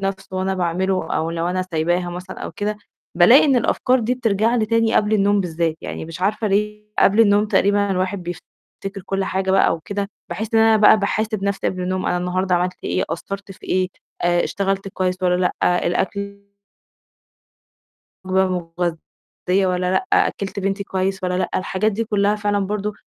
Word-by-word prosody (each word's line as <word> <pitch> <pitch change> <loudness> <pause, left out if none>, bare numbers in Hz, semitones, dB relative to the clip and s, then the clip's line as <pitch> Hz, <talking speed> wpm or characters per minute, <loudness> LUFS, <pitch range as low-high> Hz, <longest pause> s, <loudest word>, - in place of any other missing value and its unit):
نَفْسه 190 -1 -4
وأنا 190 +1 0
باعمله 185 +1 -1
أو 160 +1 -1
لو 165 0 -2
أنا 185 +1 -1
سايباها 175 0 -1
مثلًا 180 +1 -8
أو - - -6
كده، 210 +1 -3 0.4
بالاقي 185 +10 +7
إن 275 -4 +3
الأفكار 250 +2 +2
دي 235 +3 0
بترجع 225 -1 +1
لي 220 -2 +1
تاني 230 0 +2
قبل 210 0 +2
النوم 205 0 +3
بالذات، 165 -3 -1
يعني - - -6
مش 165 +2 -9
عارفة 215 +3 0
ليه 210 +1 -1
قبل 205 +3 +5
النوم 205 -1 +4
تقريبًا 200 0 +2
الواحد 185 0 -1
بيفتكر 180 +3 -9
كلّ 195 0 -1
حاجة 190 0 -1
بقى 190 -3 +4
وكده، 200 +5 -4 0.2
باحس 220 +1 -4
إن 225 - +5
أنا 225 0 +5
بقى 215 0 +6
باحاسب 215 0 -1
نَفْسي 200 -1 -1
قبل 185 -1 -4
النوم، 185 +1 -2
أنا - - +1
النهارده 180 +1 0
عملت 180 +1 -2
إيه؟ - - 0
قصّرت 195 +3 -6
في - - -15
إيه؟ 185 0 +1 0.3
آآ، 175 0 +2
اشتغلت 195 0 -2
كويس 185 -1 -2
والّا 180 -1 +3 0.3
لأ؟ 180 0 +2
الأكل 200 +3 -2 1.8
مغ 190 0 +2 0.3
مغذية 180 +2 -2
والّا 180 0 0
لأ؟ 280 - 0
أكِّلت 200 0 +1
بنتي 195 +1 -2
كويس 190 0 -2
والّا 180 0 0
لأ؟ - - 0
الحاجات 190 +3 0
دي 225 +3 -2
كلّها 205 -1 +1
فعلًا 205 -1 0
برضو 210 +1 -2
195 Hz, 175 wpm, -21 LUFS, 180-205 Hz, 1.8 s, بالاقي